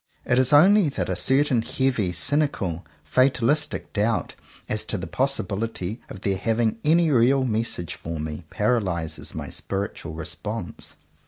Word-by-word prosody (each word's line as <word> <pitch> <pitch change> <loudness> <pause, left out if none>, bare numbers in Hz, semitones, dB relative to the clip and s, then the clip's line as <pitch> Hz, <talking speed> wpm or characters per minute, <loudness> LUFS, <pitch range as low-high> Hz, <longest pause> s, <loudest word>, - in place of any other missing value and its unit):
It 125 - +3
is 130 +1 +3
only 180 +4 +6
that 140 - -3
a - - 0
certain 130 -2 +3
heavy, 115 -5 0
cynical, 95 - 0 0.2
fatalistic 130 +2 +1
doubt 110 +2 0 0.3
as 110 - -2
to 110 - -2
the 90 - -5
possibility 110 -1 -2
of 95 - -9
their 100 -1 0
having 115 +2 0
any 160 +1 +4
real 130 +2 +4
message 110 -7 -1
for 80 0 -6
me, 75 +1 -5
paralyzes 95 -8 -1
my - - -5
spiritual 95 -5 -4
response. 90 +5 -5
115 Hz, 140 wpm, -24 LUFS, 95-135 Hz, 0.3 s, only